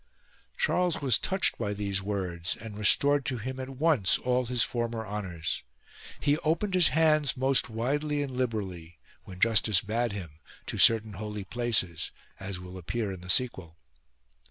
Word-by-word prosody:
Charles 180 - +1
was 130 -5 +3
touched 190 0 0
by 105 -3 -2
these 100 -1 -1
words 90 -4 -3
and 110 -2 -9
restored 140 +7 +3
to 130 -3 -2
him 130 +4 -6
at 130 0 -5
once 135 - +3
all 125 0 0
his 120 -2 +2
former 115 -2 -3
honours. 95 -6 -4 0.6
He 145 +1 +1
opened 170 +6 -1
his 180 -3 +6
hands, 155 -2 +2
most 130 0 +3
widely 145 +6 -1
and 135 -3 -6
liberally, 95 -9 -4 0.3
when 90 -1 -11
justice 110 -3 +3
bade 115 +2 -1
him, 85 -7 -8 0.3
to - - -5
certain 110 -2 +6
holy 105 +1 -6
places, 100 -5 -1 0.3
as 95 -1 -5
will 90 +1 -9
appear 105 +4 -3
in 95 -2 -8
the 90 - -11
sequel. 90 -6 +1
115 Hz, 155 wpm, -28 LUFS, 95-130 Hz, 0.6 s, his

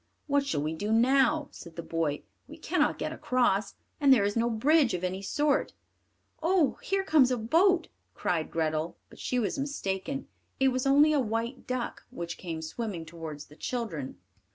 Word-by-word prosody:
"What 285 -1 +2
shall 210 - -1
we 155 +1 -1
do 205 +7 -3
now?" 270 +6 +3
said 170 -2 -11
the 170 - -5
boy. 160 -3 -1 0.2
"We - - -11
cannot - - +1
get - - -3
across, 215 -6 +1 0.2
and 280 -2 +5
there 240 -6 +6
is 205 0 0
no 235 +1 +2
bridge 265 - +3
of 180 - -5
any 185 +1 -2
sort." 290 +8 +1 0.7
"Oh! 330 -4 +2
here 390 0 0
comes 310 -7 +5
a 250 - +1
boat," 335 - +3 0.3
cried 165 -3 -1
Grethel, 160 +1 -1
but - - -15
she 250 - -1
was 240 +3 0
mistaken; 270 -2 -3 0.3
it 265 0 +5
was 255 +1 -1
only 290 +3 +6
a 295 - +3
white 230 +2 -2
duck 255 -1 -3
which 170 -9 -6
came 165 -3 -5
swimming 180 0 -4
towards 155 -2 -8
the 150 - -17
children. 165 - -4
235 Hz, 175 wpm, -29 LUFS, 170-275 Hz, 0.7 s, there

